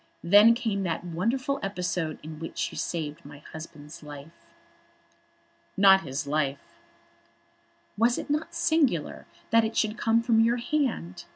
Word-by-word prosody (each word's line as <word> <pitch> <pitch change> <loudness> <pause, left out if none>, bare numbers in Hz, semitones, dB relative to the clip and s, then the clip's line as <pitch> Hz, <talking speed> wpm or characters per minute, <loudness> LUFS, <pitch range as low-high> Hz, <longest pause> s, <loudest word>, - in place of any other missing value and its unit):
Then 205 +6 +7
came 225 -5 -2
that 170 -3 -2
wonderful 230 +11 -1
episode 180 -5 -3
in 155 0 -9
which 165 - -4
you - - -11
saved 155 -3 -4
my 145 +1 -12 0.2
husband's 155 -2 -10
life." 145 +1 -10 1.5
"Not 195 -1 +7
his 140 -2 -4
life." 140 -1 -3 1.2
"Was 235 +2 +3
it - - -5
not 300 +2 -2
singular 280 - 0 0.2
that 230 0 +5
it 220 +1 -3
should 215 0 0
come 230 0 +2
from 230 -2 +3
your 230 +2 +3
hand? 245 - -2
190 Hz, 135 wpm, -27 LUFS, 155-230 Hz, 1.5 s, Then